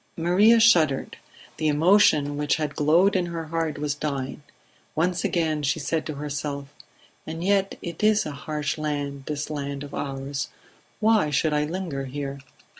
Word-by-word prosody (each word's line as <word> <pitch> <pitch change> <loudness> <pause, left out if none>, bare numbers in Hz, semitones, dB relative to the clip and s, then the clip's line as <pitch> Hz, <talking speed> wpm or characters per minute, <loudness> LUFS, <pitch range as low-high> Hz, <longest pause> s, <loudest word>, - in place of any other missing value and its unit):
Maria 195 +8 +5
shuddered; 165 -12 +4 0.4
the 155 - 0
emotion 150 -2 +4
which 145 0 +1
had 150 -2 -3
glowed 170 +7 +4
in 180 -2 +1
her 165 -1 -4
heart 165 -2 -1
was 145 -1 -1
dying; 140 -2 -4 0.5
once 175 +2 0
again 160 -3 0
she 140 +2 0
said 160 +1 -2
to 155 - -4
herself: 145 -1 -5 0.5
"And 165 +1 -5
yet 195 0 +1
it 170 +3 -6
is 215 0 +4
a 150 - -4
harsh 150 +2 -3
land, 145 -2 -3
this 150 0 -3
land 140 -1 -4
of 145 - -10
ours... 135 0 -3 0.5
Why 215 -7 +3
should 150 +2 +1
I 150 0 +1
linger 160 -5 -4
here?" 140 +1 -5
150 Hz, 160 wpm, -25 LUFS, 145-170 Hz, 0.5 s, Maria